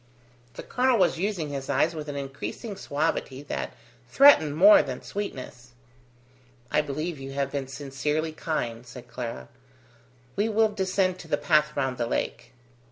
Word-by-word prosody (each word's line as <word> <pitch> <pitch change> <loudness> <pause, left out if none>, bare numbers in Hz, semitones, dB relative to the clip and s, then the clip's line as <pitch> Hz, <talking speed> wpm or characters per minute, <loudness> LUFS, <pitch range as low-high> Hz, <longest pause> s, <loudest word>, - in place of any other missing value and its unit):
The - - -7
colonel 250 -1 +2
was 180 -4 +2
using 185 -6 -1
his 140 -1 -5
eyes 140 +4 +2
with 155 -2 -6
an 145 - -5
increasing 140 - -6
suavity 145 -5 -2
that 70 - -4 0.3
threatened 160 - +6
more 200 +5 +8
than 130 -2 -6
sweetness. 130 -11 -6 1.0
"I - - +3
believe 150 +2 -4
you 135 0 -7
have 140 -1 -1
been 140 -2 -3
sincerely 145 +4 -2
kind," 120 -7 -3
said 125 0 -11
Clara. 115 - -6 0.9
"We 210 +3 +1
will 220 0 +3
descend 190 -2 0
to 165 - -10
the 145 - +1
path 150 0 +2
round 130 -3 -1
the 120 - 0
lake." - - -3
150 Hz, 155 wpm, -26 LUFS, 135-180 Hz, 1.0 s, more